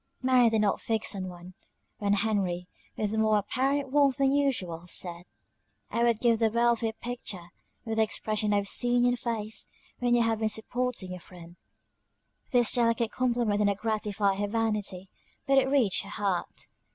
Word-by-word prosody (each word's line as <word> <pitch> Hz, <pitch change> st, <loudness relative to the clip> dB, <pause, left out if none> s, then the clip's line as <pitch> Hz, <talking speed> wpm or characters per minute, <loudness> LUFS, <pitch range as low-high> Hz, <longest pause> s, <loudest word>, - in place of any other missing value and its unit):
Mary 255 Hz, -2 st, +5 dB
did 220 Hz, -1 st, +1 dB
not 205 Hz, -2 st, +1 dB
fix 220 Hz, -1 st, 0 dB
on 185 Hz, -1 st, -4 dB
one 180 Hz, 0 st, -11 dB, 0.5 s
when 205 Hz, -1 st, +1 dB
Henry, 195 Hz, -4 st, 0 dB, 0.3 s
with 210 Hz, -1 st, -1 dB
more 220 Hz, -1 st, +3 dB
apparent 270 Hz, +6 st, -1 dB
warmth 280 Hz, -2 st, +3 dB
than 275 Hz, -1 st, +3 dB
usual, 195 Hz, -13 st, -1 dB
said, 175 Hz, -1 st, -1 dB, 0.7 s
"I 235 Hz, -, 0 dB
would 235 Hz, -2 st, +2 dB
give 235 Hz, -2 st, +2 dB
the 225 Hz, -1 st, +3 dB
world 235 Hz, +1 st, +2 dB
for 230 Hz, -, -3 dB
your 220 Hz, -, -1 dB
picture, 210 Hz, -8 st, -6 dB, 0.3 s
with 225 Hz, -1 st, -3 dB
the 220 Hz, -, +5 dB
expression 215 Hz, -1 st, -2 dB
I -, -, +3 dB
have 200 Hz, 0 st, 0 dB
seen 245 Hz, +3 st, +3 dB
in 245 Hz, -, +4 dB
your 245 Hz, -, -1 dB
face, 225 Hz, -2 st, -3 dB, 0.3 s
when 245 Hz, -1 st, +2 dB
you 240 Hz, -, +3 dB
have 225 Hz, -1 st, 0 dB
been 220 Hz, -1 st, 0 dB
supporting 220 Hz, -2 st, -3 dB
your 180 Hz, -, -6 dB
friend." 175 Hz, -1 st, -14 dB, 1.0 s
This 245 Hz, -3 st, +4 dB
delicate 230 Hz, -1 st, +2 dB
compliment 240 Hz, -4 st, 0 dB
did 210 Hz, -, +2 dB
not 200 Hz, -1 st, 0 dB
gratify 210 Hz, -2 st, -1 dB
her 205 Hz, +1 st, -1 dB
vanity, 210 Hz, -4 st, -2 dB, 0.4 s
but 275 Hz, 0 st, +4 dB
it 265 Hz, 0 st, 0 dB
reached 255 Hz, -9 st, +2 dB
her 195 Hz, -, -10 dB
heart. 200 Hz, -3 st, -3 dB
220 Hz, 185 wpm, -28 LUFS, 200-240 Hz, 1.0 s, Mary